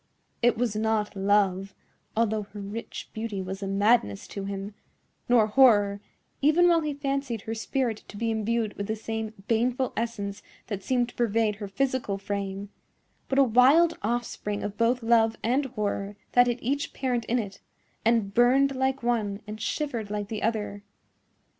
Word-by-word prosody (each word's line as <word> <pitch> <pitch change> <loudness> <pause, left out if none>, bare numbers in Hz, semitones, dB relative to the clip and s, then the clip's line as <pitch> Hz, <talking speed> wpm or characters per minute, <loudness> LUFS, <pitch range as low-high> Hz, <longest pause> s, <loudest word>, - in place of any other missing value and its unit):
It 240 -2 +3
was 230 -3 0
not 215 -1 0
love, 195 -1 +1 0.4
although 220 -1 +2
her 205 0 -10
rich 205 +3 -7
beauty 220 -3 -4
was 190 +1 -5
a 195 - -3
madness 195 - +2
to 200 -1 -5
him; 200 +1 -5 0.6
nor 240 -3 +6
horror, 210 -4 +4 0.4
even 310 +5 +5
while 340 -1 +4
he 300 -2 -2
fancied 275 -5 -2
her 225 - -4
spirit 230 0 -2
to 205 - -10
be 230 +1 0
imbued 220 0 0
with 200 - -4
the 220 - -1
same 220 0 -4 0.2
baneful 245 +3 +1
essence 210 -3 -3 0.2
that 205 -4 -4
seemed 245 +2 0
to - - -15
pervade 225 -2 +1
her 205 -1 -5
physical 250 -2 -1
frame; 200 0 -4 0.6
but 270 - 0
a 275 - +7
wild 270 +8 +5
offspring 215 -2 -2
of 205 0 -4
both 235 +2 +1
love 225 -1 +3
and 255 +5 +2
horror 205 -4 -3 0.2
that 245 0 +5
had 240 -1 0
each 280 +4 -1
parent 250 -3 -1
in 245 - +1
it, 200 -5 -4 0.4
and 225 -3 +2
burned 265 +4 +4
like 265 0 0
one 215 -4 0
and 215 +1 -7
shivered 235 -3 -2
like 205 -1 -3
the 215 -2 -4
other. 210 -2 -2
225 Hz, 165 wpm, -27 LUFS, 205-245 Hz, 0.6 s, a